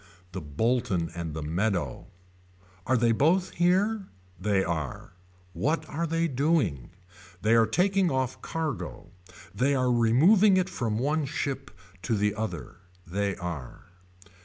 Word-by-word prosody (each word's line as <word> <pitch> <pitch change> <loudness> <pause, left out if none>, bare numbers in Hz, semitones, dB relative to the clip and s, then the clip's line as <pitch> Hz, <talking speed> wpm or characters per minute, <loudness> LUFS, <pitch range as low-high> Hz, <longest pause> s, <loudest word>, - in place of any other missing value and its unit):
The 95 +1 -5
Bolton 90 - 0
and 85 -3 -5
the 80 - -4
Meadow. 85 - -1 0.8
Are 130 0 +3
they 120 0 +3
both 165 +10 +2
here. 190 +4 +1 0.3
They 95 0 +1
are. 80 -4 -4 0.4
What 155 - -1
are 165 +3 -2
they 165 +1 +1
doing. 135 - 0 0.5
They 110 +1 +4
are 115 -1 +5
taking 190 0 +2
off 130 -3 -2
cargo. 155 - -4 0.2
Are - - -16
they 140 +3 +2
removing 130 - +5
it 185 0 +1
from 110 -4 -2
one 150 +5 0
ship 140 0 -3 0.3
to 115 +3 0
the 105 0 +1
other. 110 -4 -5 0.3
They 100 +3 -1
are. 85 -3 -7
120 Hz, 135 wpm, -27 LUFS, -, 0.8 s, are